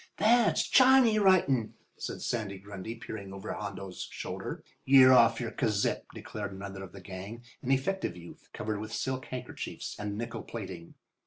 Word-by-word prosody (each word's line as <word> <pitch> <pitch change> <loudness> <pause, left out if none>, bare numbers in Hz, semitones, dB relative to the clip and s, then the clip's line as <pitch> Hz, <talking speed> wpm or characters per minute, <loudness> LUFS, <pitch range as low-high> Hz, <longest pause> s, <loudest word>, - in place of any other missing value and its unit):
"That's 235 +1 +4
Chiny 255 -4 +6
writin'," 155 - +3 0.2
said - - -6
Sandy 105 -5 -2
Grundy, 100 +3 -7
peering 105 -3 -7
over 95 +2 -5
Hondo's 100 -3 -6
shoulder. - - -5 0.2
"You're 130 -1 +8
off 115 -2 +6
your 115 -2 -3
kazip," 105 -3 0
declared 100 -2 -6
another 95 0 -7
of 95 - -9
the 95 - -11
gang, 100 +5 -8 0.2
an 130 - -5
effective 135 - 0
youth, 85 0 -13
covered 110 -1 -3
with 110 +1 -6
silk 130 +3 -2
handkerchiefs 130 -1 -6
and 105 -1 -3
nickel 115 0 -4
plating. 95 -7 -8
110 Hz, 155 wpm, -30 LUFS, 100-130 Hz, 0.2 s, You're